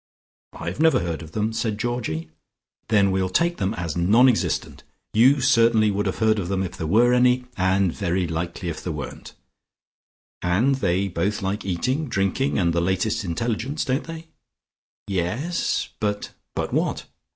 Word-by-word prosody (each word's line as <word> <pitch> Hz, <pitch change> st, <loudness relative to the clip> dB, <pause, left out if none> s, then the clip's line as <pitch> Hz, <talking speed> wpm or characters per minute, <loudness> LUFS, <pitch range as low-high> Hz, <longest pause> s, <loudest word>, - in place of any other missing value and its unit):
"I've 85 Hz, -, -6 dB
never 160 Hz, -8 st, +4 dB
heard 85 Hz, -2 st, -3 dB
of 80 Hz, -1 st, -11 dB
them," 110 Hz, +1 st, -1 dB
said 110 Hz, -2 st, -1 dB
Georgie. 110 Hz, -10 st, -3 dB, 0.6 s
"Then 100 Hz, -3 st, +3 dB
we'll 95 Hz, 0 st, 0 dB
take 170 Hz, -, +1 dB
them 100 Hz, +2 st, -1 dB
as 85 Hz, -6 st, -4 dB
non 105 Hz, +9 st, +5 dB
existent. 125 Hz, -4 st, 0 dB, 0.3 s
You 130 Hz, +5 st, +5 dB
certainly 115 Hz, -4 st, +4 dB
would 100 Hz, +1 st, -1 dB
have 95 Hz, -, -2 dB
heard 110 Hz, -1 st, +2 dB
of 90 Hz, -, -3 dB
them 95 Hz, -1 st, 0 dB
if 90 Hz, 0 st, -5 dB
there 80 Hz, -5 st, -4 dB
were 120 Hz, +7 st, +4 dB
any, 125 Hz, 0 st, +3 dB
and 95 Hz, -1 st, +2 dB
very 95 Hz, -2 st, -1 dB
likely 85 Hz, +2 st, -4 dB
if 80 Hz, -, -6 dB
there 90 Hz, -, -3 dB
weren't. 70 Hz, -3 st, -8 dB, 1.1 s
And 100 Hz, +10 st, +2 dB
they 95 Hz, -4 st, +1 dB
both 100 Hz, +4 st, -2 dB
like 100 Hz, +2 st, -2 dB
eating, 130 Hz, -, -1 dB
drinking 100 Hz, +7 st, 0 dB
and 85 Hz, -3 st, +2 dB
the 85 Hz, -, +1 dB
latest 95 Hz, +5 st, 0 dB
intelligence. 115 Hz, -, -2 dB
Don't 135 Hz, +1 st, -1 dB
they?" 165 Hz, 0 st, -8 dB, 0.8 s
"Yes. 100 Hz, -, -1 dB
But 105 Hz, -1 st, -2 dB
" -, -, -55 dB
"But -, -, -2 dB
what? -, -, -1 dB
100 Hz, 165 wpm, -23 LUFS, 90-120 Hz, 1.1 s, non